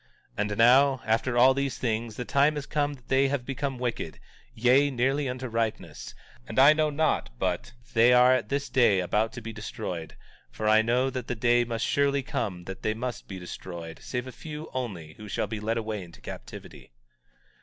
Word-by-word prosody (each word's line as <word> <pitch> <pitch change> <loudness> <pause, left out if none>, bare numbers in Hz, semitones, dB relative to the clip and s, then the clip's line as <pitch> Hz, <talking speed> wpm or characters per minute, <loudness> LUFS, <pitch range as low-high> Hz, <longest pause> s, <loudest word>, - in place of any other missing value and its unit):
17:43 - - -11
And 105 - -3
now, 130 +3 +5
after 115 +3 +1
all 130 +2 +7
these 140 -1 -2
things, 115 -2 -2
the 125 - -5
time 140 +7 +3
has 145 -1 -4
come 145 -1 -1
that 125 -3 -21
they 135 +1 +3
have 135 -2 -2
become 135 0 -3
wicked, 125 -1 -3 0.4
yea, 130 +5 +4
nearly 135 +2 0
unto 130 +1 -4
ripeness; 115 -1 -3 0.3
and - - -7
I 140 +3 +8
know 155 0 +1
not 150 - 0
but - - -2 0.2
they 115 +2 +6
are 125 +1 +6
at 130 - -1
this 140 +1 -1
day 120 -7 +4
about 105 +5 0
to 125 - -7
be 115 0 -7
destroyed; 90 -6 -6 0.3
for 110 - -4
I 110 0 +6
know 125 +4 +1
that 125 -2 -5
the 125 - -2
day 120 +1 +3
must 115 -1 -2
surely 140 -1 +1
come 90 -8 -3
that 95 +2 -8
they 110 - -1
must 125 +2 -5
be 95 - -7
destroyed, 85 -2 -8
save 125 -1 -4
a 130 - -7
few 155 +3 -8
only, 95 -12 -5
who 110 - -10
shall 100 - -1
be 105 +1 -5
led 110 +2 -1
away 110 -2 -3
into 85 -1 -14
captivity. - - -10
125 Hz, 200 wpm, -27 LUFS, 110-135 Hz, 0.4 s, I